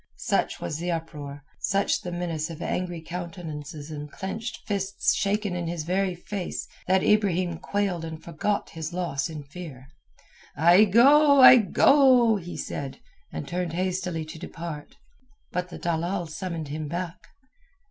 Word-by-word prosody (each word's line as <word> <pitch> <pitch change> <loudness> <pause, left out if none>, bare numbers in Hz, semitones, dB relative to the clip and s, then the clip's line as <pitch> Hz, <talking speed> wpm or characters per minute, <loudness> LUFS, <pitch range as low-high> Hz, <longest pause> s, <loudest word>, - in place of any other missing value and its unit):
Such - - 0
was 85 - -4
the 175 +1 -3
uproar, 150 -4 -5 0.2
such 200 0 +1
the 180 - -5
menace 170 -2 -3
of 165 - -8
angry 175 -2 -3
countenances 160 -3 -7
and 150 -1 -7
clenched 220 +5 -6
fists 200 -1 0
shaken 205 -1 0
in 175 -1 -3
his 170 -2 -3
very 185 +2 0
face, 180 +1 -5 0.2
that 190 0 +3
Ibrahim 185 -5 +2
quailed 195 -4 -1
and 160 -1 -6
forgot 170 +6 -2
his 160 +1 -5
loss 160 -6 -2
in 155 -2 -7
fear. 140 -3 -10 0.7
"I 175 +7 +7
go, 280 +7 +6
I 255 - +11
go," 250 0 +5
he 175 -2 -7
said, 135 -2 -5 0.3
and 80 - -5
turned 175 -2 -2
hastily 180 -2 -2
to 155 +1 -9
depart. 165 -3 -7 0.6
But 180 0 -2
the - - -8
dalal 175 +2 -1
summoned 165 -1 -5
him 155 +1 -4
back. 175 +2 -4
175 Hz, 145 wpm, -26 LUFS, 160-195 Hz, 0.7 s, I